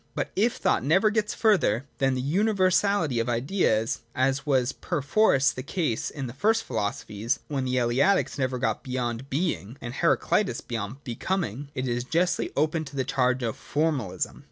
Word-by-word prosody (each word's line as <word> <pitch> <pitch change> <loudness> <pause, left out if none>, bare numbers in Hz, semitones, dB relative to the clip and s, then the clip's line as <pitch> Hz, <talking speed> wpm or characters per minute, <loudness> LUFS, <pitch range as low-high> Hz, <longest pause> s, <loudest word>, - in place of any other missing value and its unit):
But - - -2
if 225 +4 +2
thought - - +1
never 190 - +4
gets 215 0 0
further 180 - +2
than 135 -1 +2
the 130 - -1
universality 185 - +2
of 115 - -1
the 120 - +1
Ideas, 115 - +1 0.2
as 135 +3 0
was 130 -3 +2
perforce 140 -3 +2
the 130 - -6
case 145 - -2
in 140 -3 -5
the 120 - -6
first 220 +10 +2
philosophies 110 +1 -2
(when 135 -3 -1
the 130 0 -1
Eleatics 130 +10 +2
never 130 -1 0
got 135 - -1
beyond 125 0 -3
Being, 140 - -2
or 120 - -6
Heraclitus 175 +7 +1
beyond 115 +4 -5
Becoming), 140 - -3
it 130 0 -2
is 120 0 -1
justly 170 +6 0
open 155 +2 +1
to 140 0 -10
the 135 - 0
charge 125 -1 +1
of 115 -2 -1
formalism. 140 - -2
135 Hz, 170 wpm, -26 LUFS, 120-170 Hz, 0.2 s, never